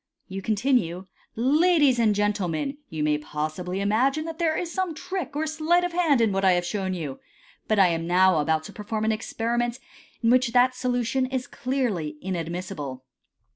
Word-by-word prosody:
You 195 +1 -5
continue, 205 -5 0
" - - -36
Ladies 290 +1 +4
and 215 -3 +3
gentlemen, 205 - -1
you 155 -1 -3
may 150 0 +2
possibly 155 +6 -4
imagine 260 +9 +1
that 330 0 -6
there 325 -2 +1
is 340 -1 -3
some 375 -4 -1
trick 365 -1 -5
or 310 +2 0
sleight 315 +3 +1
of 355 -1 -2
hand 320 -8 +3
in 225 -2 +3
what 195 0 -1
I 190 -1 +5
have 175 0 0
shown 190 0 -2
you, 150 -6 -5 0.5
but 215 - +2
I 190 -2 +6
am 165 0 -2
now 185 -1 +4
about 155 +1 +1
to - - -10
perform 215 +1 -3
an 220 - +2
experiment 235 +2 -1 0.5
in 230 - +4
which 255 -2 +3
that 250 +1 +5
solution 250 +1 0
is 260 -1 -3
clearly 235 - -2
inadmissible. 165 -7 -5
220 Hz, 180 wpm, -25 LUFS, 180-270 Hz, 0.5 s, I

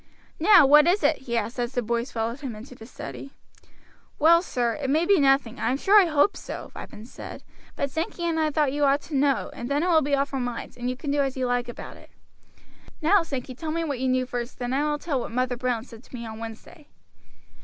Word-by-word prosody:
"Now, 355 -2 +7
what 300 +3 +7
is 360 +1 +2
it?" 290 - +3
he 235 - +1
asked 230 +3 -3
as 240 +1 -2
the 245 - -1
boys 235 +3 -2
followed 230 +3 -3
him 265 -7 -6
into 230 +5 -11
the 225 -2 -12
study. 280 0 -9 0.8
"Well, 335 +2 +6
sir, 245 -9 -1
it 270 - -2
may 315 +4 +2
be 400 0 +4
nothing, 270 -3 +2
I 225 - 0
am 260 - +1
sure 405 +7 +6
I 365 - +2
hope 305 +5 +3
so," - - -8
Ripon 215 +1 -9
said, 245 - -10 0.3
"but 280 - -2
Sankey 325 +3 -3
and 330 -1 0
I 310 -1 +2
thought 295 -3 +1
you 295 0 0
ought 280 +1 +3
to 305 - -7
know 275 -1 +1
and 240 - -6
then 285 +3 +1
it 360 - +1
will 320 -2 +5
be 285 0 +1
off 275 0 -1
our 270 - -1
minds, 245 -2 -5
and 245 0 -3
you 255 - -3
can 285 +1 -4
do 290 - +1
as 270 -1 -2
you 260 - 0
like 245 0 -1
about 240 - -9
it. - - -17 0.9
Now, 365 +5 +4
Sankey, 265 -5 -5
tell 310 +5 -5
what 315 -5 -2
you 260 - 0
knew 255 0 +1
first, 245 -1 -5
then 245 0 -3
I 290 +3 +1
will 295 - 0
tell 290 -3 -2
what - - -5
Mother 250 +1 0
Brown 245 -2 -2
said 230 -4 -13
to - - -11
me 235 -1 -6
on 220 0 -8
Wednesday." 230 +6 -10
270 Hz, 250 wpm, -25 LUFS, 245-300 Hz, 0.9 s, Now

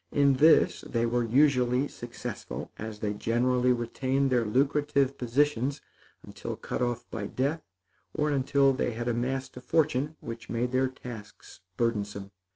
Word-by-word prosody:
In 140 -1 +4
this 155 +3 +5
they 115 -1 -1
were 120 +1 +1
usually 125 +1 +3
successful, 120 -3 -7
as 110 0 -6
they 105 -1 -1
generally 125 +4 +1
retained 130 +3 0
their 120 -2 +3
lucrative 140 +3 +1
positions 135 +2 0 0.4
until - - -6
cut - - -5
off 120 -1 -1
by 105 -3 -4
death, 140 +8 -1 0.5
or 150 0 0
until 135 0 +3
they 125 -2 -1
had 120 +2 -4
amassed 125 +2 -2
a - - -7
fortune 150 +1 +1
which 115 0 -8
made 120 +1 -1
their 130 +1 +2
tasks 120 -5 -10 0.2
burdensome. 105 -4 -2
125 Hz, 145 wpm, -28 LUFS, 115-140 Hz, 0.5 s, this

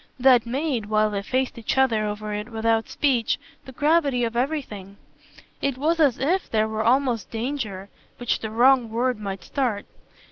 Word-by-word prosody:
That 250 -2 +5
made, 260 -3 -2
while 215 0 +2
they 200 -1 -2
faced 255 +3 -2
each 225 - -2
other 230 -5 +3
over 210 0 -4
it 210 +2 -4
without 225 0 0
speech, 255 -6 +1 0.3
the 265 - -10
gravity 290 -2 +2
of 230 0 -2
everything. 235 -8 -3 0.6
It 275 -2 -1
was 325 +5 +1
as 285 -7 +4
if 345 +8 0
there 220 -1 +1
were 220 0 -2
almost 245 -1 +1
danger, 225 -5 -4 0.3
which 245 -1 -1
the 220 - -5
wrong 245 +1 +4
word 240 +1 -1
might 195 -2 -5
start. 245 -8 -2
235 Hz, 170 wpm, -24 LUFS, 215-265 Hz, 0.6 s, That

